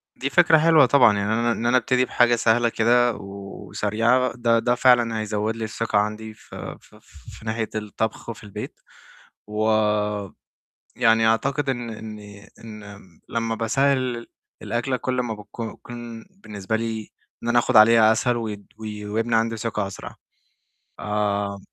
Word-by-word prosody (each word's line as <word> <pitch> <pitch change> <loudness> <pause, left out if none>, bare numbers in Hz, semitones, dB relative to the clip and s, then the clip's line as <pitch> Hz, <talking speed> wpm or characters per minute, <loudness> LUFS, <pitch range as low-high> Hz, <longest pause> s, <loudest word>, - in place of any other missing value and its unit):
دي 140 - -3
فكرة 170 0 +5
حلوة 155 -2 +5
طبعًا، 120 -6 +5
يعني 100 +2 -1
أنا 115 +1 +1
إن 115 - -3
أنا 120 +2 +4
أبتدي 125 +1 +1
بحاجة 120 -1 +3
سهلة 120 +1 +2
كده 120 +2 +3
و 100 0 -9 0.2
وسريعة، 115 +5 +1
ده 115 -1 +2
ده 120 +1 +1
فعلًا 120 -3 +3
هيزود 110 +1 -2
لي 115 - -5
الثقة 110 0 -2
عندي 110 +1 -3
ف 110 - -15
ف - - -10 0.4
في 110 - -15
ناحية 110 0 -2
الطبخ، 110 +2 -4
وفي 110 -2 -8
البيت. 100 - -8 0.7
ويعني 105 -2 -1 0.8
أعتقد 135 +5 0
إن 120 -2 -4
إني 105 -2 -10 0.2
إن 105 -2 -10 0.3
لمّا 115 -1 -2
باسهِّل 125 +1 0 0.4
الأكلة 120 +5 -1
كُلّ 125 0 -2
ما 115 -3 -3
بتك 105 -1 -14 0.3
كون 120 -1 -9
بالنسبة 110 - -5
لي، 110 -1 -4 0.3
إن 120 - -3
أنا 120 - +4
آخد 120 0 +1
عليها 110 0 +7
أسهل 120 +2 0
ود 105 -3 -5
وي 105 -1 -7
ويبني 115 +2 -1
عندي 115 0 0
ثقة 105 -2 -2
أسرع. 95 -1 -9 0.8
آآ 105 -1 -1
115 Hz, 150 wpm, -23 LUFS, 105-120 Hz, 0.8 s, عليها